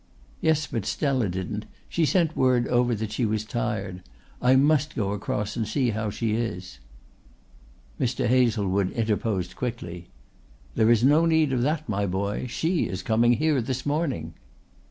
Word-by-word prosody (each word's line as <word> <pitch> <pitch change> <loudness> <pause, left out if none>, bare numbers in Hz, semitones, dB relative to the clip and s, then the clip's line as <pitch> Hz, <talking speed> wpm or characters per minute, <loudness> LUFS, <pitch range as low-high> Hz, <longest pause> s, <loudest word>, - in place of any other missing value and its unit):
"Yes, 155 -1 +2
but 115 -7 -4
Stella 130 - 0
didn't. 95 +4 -4 0.2
She 165 -3 +1
sent 165 -3 +2
word 125 -2 +2
over 120 -1 +2
that 110 0 -4
she 110 - -2
was 110 -1 0
tired. 110 -6 -3 0.4
I 125 +1 +5
must 145 +1 +3
go 100 -3 -1
across 105 +1 -3
and 110 -3 -2
see 125 +1 +1
how 110 0 -2
she 110 +1 -2
is." 95 - -4 1.2
Mr. 125 0 0
Hazlewood 105 -6 +2
interposed 105 -5 -1
quickly: 90 -9 -5 0.7
"There 110 - +3
is 120 -1 +4
no 150 +5 +5
need 160 -4 +3
of 125 - +1
that, 155 +4 -1
my 100 -2 -1
boy; 100 +6 -2
she 165 +7 0
is 95 - -5
coming 115 +2 +3
here 150 0 +2
this 130 +2 -3
morning." 145 - -1
115 Hz, 155 wpm, -25 LUFS, 105-130 Hz, 1.2 s, I